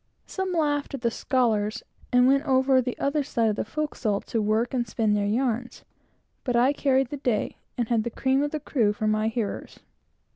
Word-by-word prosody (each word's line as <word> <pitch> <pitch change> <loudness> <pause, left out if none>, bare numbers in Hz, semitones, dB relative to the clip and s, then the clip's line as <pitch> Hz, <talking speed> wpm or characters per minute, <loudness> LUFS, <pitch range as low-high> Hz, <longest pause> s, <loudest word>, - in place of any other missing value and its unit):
Some 380 -1 -3
laughed 290 -4 0
at 265 - -8
the 235 -1 +1
"scholars," 225 -4 0 0.3
and 250 0 +5
went 275 +2 +4
over 260 -1 +3
the 250 0 -4
other 285 +2 0
side 230 -5 0
of - - -3
the - - -2
forecastle, 225 -6 -2
to 225 - -2
work, 220 +4 0
and 240 -2 0
spin 215 0 0
their 205 -1 +1
yarns; 240 +2 -2 0.6
but 245 -3 -1
I 250 +4 +4
carried 270 -3 +1
the 290 - -5
day, 245 -6 -1 0.2
and 240 -2 0
had 230 -2 +1
the 235 - -2
cream 265 +3 +1
of 290 - 0
the 305 - -3
crew 235 -8 +1
for 215 - -4
my 215 0 +1
hearers. 225 -2 -4
245 Hz, 205 wpm, -26 LUFS, 220-275 Hz, 0.6 s, and